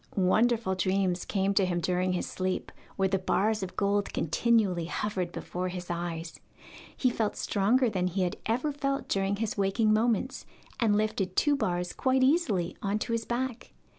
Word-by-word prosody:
Wonderful 220 +2 +2
dreams 185 -1 0
came 195 -1 0
to 195 - +3
him 180 -2 0
during 180 +2 0
his 180 - -1
sleep, 185 0 -3 0.2
where 195 -1 +2
the 195 0 0
bars 210 +3 +1
of 190 - -5
gold 200 0 +1
continually 185 0 +1
hovered 185 0 -2
before 180 +1 -4
his 180 -1 -5
eyes. 170 -1 -4 0.6
He 255 - +2
felt 220 -3 -1
stronger 230 +6 +2
than 185 -5 0
he 185 +1 0
had 180 - -2
ever 255 +7 0
felt 275 -1 -2
during 195 0 0
his 215 0 -3
waking 215 +3 +2
moments, 230 +3 0 0.3
and 220 -4 +3
lifted 200 -3 -1
two 295 -1 +3
bars 180 -8 -1
quite 260 0 +2
easily 260 - +2
on 200 +1 0
to 215 - -4
his 230 -1 -1
back. 245 0 -3
200 Hz, 170 wpm, -29 LUFS, 185-230 Hz, 0.6 s, to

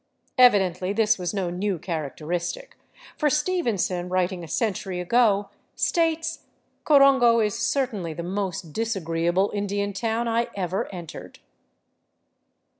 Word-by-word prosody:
Evidently 190 -6 +4
this 215 0 +2
was 180 -1 -2
no 190 -4 -2
new 190 +1 -1
characteristic, 170 - -4 0.4
for 300 - +3
Stevenson, 235 - 0
writing 180 -1 -1
a - - -8
century 190 -1 -2
ago, 205 0 +2 0.2
states, 325 -1 0 0.2
*' - - -45
Corongo 270 -5 +6
is 210 -2 +1
certainly 220 - -1
the 170 +2 -6
most 180 -3 -4
disagreeable 185 -4 0
Indian 200 0 -2
town 225 +4 -1
I 230 +1 +1
ever 185 -1 -2
entered." 165 - -9
200 Hz, 115 wpm, -25 LUFS, 180-235 Hz, 0.4 s, Corongo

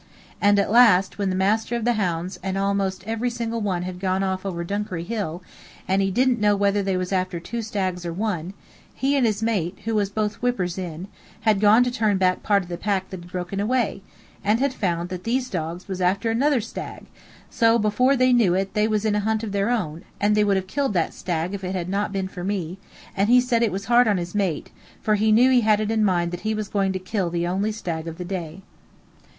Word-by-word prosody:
And 205 0 +5
at 200 - +1
last, 210 -6 +5
when 200 -1 0
the 185 - -1
master 215 +5 +1
of 235 -1 -2
the 240 - +3
hounds 180 -3 -2
and 190 0 -3 0.2
most 190 -2 -2
every 225 +3 -1
one 225 -6 -2
else - - -5
had 180 -1 -6
gone 190 0 0
off 190 0 -2
over 170 -3 -3
Dunkery 195 -2 -3
Hill, 180 -4 -4 0.4
and 190 +1 +2
he 195 - +1
didn't 250 +4 +2
know 210 -1 +3
whether 200 0 +2
they 195 -1 0
was 185 0 -3
after 185 -2 -1
two 235 +7 -5
stags 190 -5 -2
or 170 - -3
one, 185 -1 -3 0.4
he 275 +2 +1
and 260 -4 +3
his 215 0 -1
mate, 195 -6 -1
who 225 - -1
was 205 -2 +1
both 210 0 -2
whippers 190 -8 -1
in, 175 0 -6 0.3
had 215 -2 +3
gone 215 +4 +6
to 245 - -1
turn 220 -5 +1
part 190 +2 +2
of - - -12
the 175 - -5
pack 195 -2 -1
that 190 - -6
had 175 +1 -14
broken 180 +2 -4
away, 225 -1 0 0.4
and 210 +3 +2
had 275 0 +1
found 175 -6 -2
that 185 -1 -6
these 250 +2 -1
dogs 170 0 -4
was 190 -1 -4
after 195 +5 +1
another 265 +2 +2
stag, 225 - -7
and - - -18 0.4
so 230 0 +4
before 235 +5 +2
they 255 -1 +4
knew 215 -8 +4
it 195 +1 -1
they 210 0 +2
was 215 -1 0
in 215 - +2
a 210 - +1
hunt 220 +1 -1
of 215 - -4
their 200 +2 0
own, 170 -10 -2 0.2
and 205 +1 +3
they 210 0 +3
would 200 -1 +2
have 190 - -2
killed 270 +5 -1
that 170 -3 0
stag 175 0 -3
if 195 -1 -5
it 185 +1 -3
had 175 -2 -3
not 200 +1 -1
been 195 -1 -2
for 180 -1 -8
me; 190 -2 -3 0.4
and 200 +2 +1
he 250 +1 +7
said 245 -2 +1
it 230 -3 +2
was 195 +2 -4
hard 240 +2 +5
on 205 -2 +2
his 175 0 -4
mate, 195 -7 -1 0.3
for 215 - +1
he 215 +1 +2
knew 245 +4 +5
he 250 -1 +5
had 215 -1 +3
it 215 0 -1
in 220 -1 +2
mind 175 -4 +1
that 175 - -5
he 220 0 -1
was 215 -1 -3
going 195 -2 +1
to 190 - -2
kill 185 0 -2
the 170 0 -1
only 195 +5 0
stag 170 -6 -4
of 165 0 -6
the 180 - -5
day. 175 -1 -5
200 Hz, 245 wpm, -23 LUFS, 185-220 Hz, 0.4 s, he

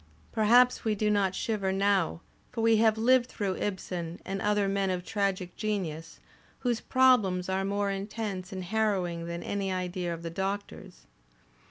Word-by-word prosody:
Perhaps 245 +3 +4
we 220 -2 +1
do 210 +1 +1
not 195 -2 +1
shiver 205 -4 -1
now; 195 -3 +1 0.3
for 235 - -3
we 225 0 +4
have 220 0 +4
lived 245 +2 +4
through 195 -4 -2
Ibsen 180 -4 -4
and 195 +1 -3
other 210 -1 +2
men 195 0 0
of 180 -1 -2
tragic 195 -4 -1
genius, 170 -7 -3 0.4
whose 240 -3 0
"problems" 215 -9 +3
are 190 +1 0
more 200 +1 0
intense 195 -1 -4
and 185 -1 -5
harrowing 180 -4 -1
than 170 0 -5
any 195 -1 -2
idea 180 -1 -2
of 170 0 -6
the 165 - -4
Doctor's. 195 - -5
195 Hz, 160 wpm, -29 LUFS, 185-215 Hz, 0.4 s, Perhaps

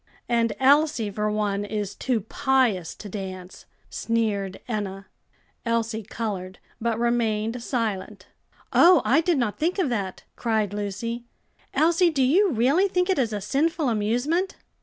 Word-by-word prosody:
"And 230 -2 +1
Elsie, 275 -5 +3
for 210 +1 -1
one, 205 -1 -1
is 205 -1 -3
too 240 +1 -1
pious 225 -5 +1
to 210 - -9
dance," 185 -2 -7 0.2
sneered 210 -4 -1
Enna. 200 -4 -4 0.6
Elsie 230 -1 -1
colored, 195 -4 -5 0.2
but 230 -1 0
remained 230 -1 0
silent. 225 -6 -3 0.5
"Oh! 350 -4 +7
I 285 +5 +4
did 335 -1 +1
not 235 -5 -1
think 345 +5 0
of 360 -8 +1
that!" 200 -6 -3
cried 220 -4 0
Lucy. 210 +4 -4 0.5
"Elsie, 340 +2 +4
do 280 -5 +1
you 370 +10 +4
really 275 - +3
think 360 0 +1
it 370 - +1
is 235 -4 +1
a 210 - -2
sinful 295 - 0
amusement?" 245 - 0
230 Hz, 140 wpm, -25 LUFS, 205-270 Hz, 0.6 s, Oh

